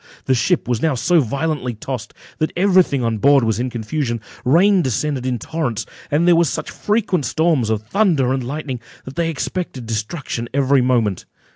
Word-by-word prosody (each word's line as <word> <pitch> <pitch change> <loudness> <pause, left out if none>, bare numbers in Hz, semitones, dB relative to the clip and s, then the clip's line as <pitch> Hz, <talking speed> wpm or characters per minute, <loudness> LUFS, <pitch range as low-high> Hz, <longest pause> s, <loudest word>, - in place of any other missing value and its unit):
The 130 - +2
ship 170 +8 +1
was 120 -3 0
now 160 -4 +1
so 170 +8 +3
violently 140 -1 -2
tossed, 120 0 -6 0.2
that 155 - 0
every 185 0 +5
thing 140 -7 -1
on 115 -2 -1
board 140 +2 +5
was 110 -2 0
in 125 +1 -1
confusion; 120 +1 -2 0.2
rain 180 +9 +4
descended 130 0 -1
in 125 -1 0
torrents, 120 -6 -3 0.2
and 155 +4 +2
there 175 - +6
were 170 - +5
such 140 - -3
frequent 210 -6 0
storms 155 -3 +1
of 110 -1 -1
thunder 140 - +2
and 135 -1 -2
lightning, 135 -1 -4 0.3
that 130 - -9
they 165 0 0
expected 160 -4 -4
destruction 115 +2 -4
every 140 -1 +3
moment. 115 -7 +1
135 Hz, 180 wpm, -20 LUFS, 120-165 Hz, 0.3 s, there